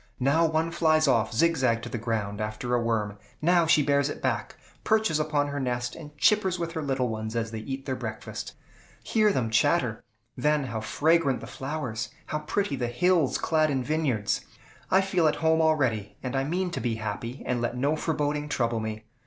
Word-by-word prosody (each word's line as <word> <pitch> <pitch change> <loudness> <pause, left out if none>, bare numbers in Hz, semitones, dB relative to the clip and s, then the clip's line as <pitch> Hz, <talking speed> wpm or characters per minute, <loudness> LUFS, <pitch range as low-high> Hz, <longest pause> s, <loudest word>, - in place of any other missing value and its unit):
Now 145 +6 +3
one 160 +1 0
flies 155 -2 +3
off 115 -4 +2
zigzag 125 -4 +2
to - - -5
the 120 - -4
ground, 110 -3 -2
after 110 +3 -3
a 120 - +3
worm; 105 -3 -1 0.2
now 170 +1 +3
she 155 -2 +5
bears 140 0 +2
it - - -5
back, - - -2 0.3
perches 220 -8 +2
upon 150 -2 0
her 145 0 -3
nest, 125 -2 -2
and 150 -2 -11
chippers 190 +1 +3
with 170 -1 -3
her 160 -1 -3
little 135 -3 0
ones 110 0 -4
as 115 -1 -1
they 110 - -4
eat 135 +4 -5
their 130 -1 -2
breakfast. 110 -3 -6 0.5
Hear 215 -2 +3
them 120 - -1
chatter! 115 +1 +2 0.3
Then 150 +3 +1
how 115 -4 -4
fragrant 150 +2 +2
the - - -8
flowers! 130 -3 -4 0.2
How 150 - -2
pretty 155 +1 -1
the 125 -2 -2
hills, 165 +3 +2
clad 155 -1 +2
in 135 -3 0
vineyards! 130 -8 0 0.5
I 190 - +5
feel 185 -4 +2
at 150 - +2
home 160 0 +2
already, 125 -11 +1
and 130 0 -3
I 135 0 +1
mean 180 +4 -1
to - - -3
be 120 -2 -1
happy, 110 +3 -5
and 125 -1 -1
let 120 +1 -2
no 140 +5 +1
foreboding 150 -1 -1
trouble 115 -4 0
me. 110 0 -4
135 Hz, 195 wpm, -27 LUFS, 115-160 Hz, 0.5 s, she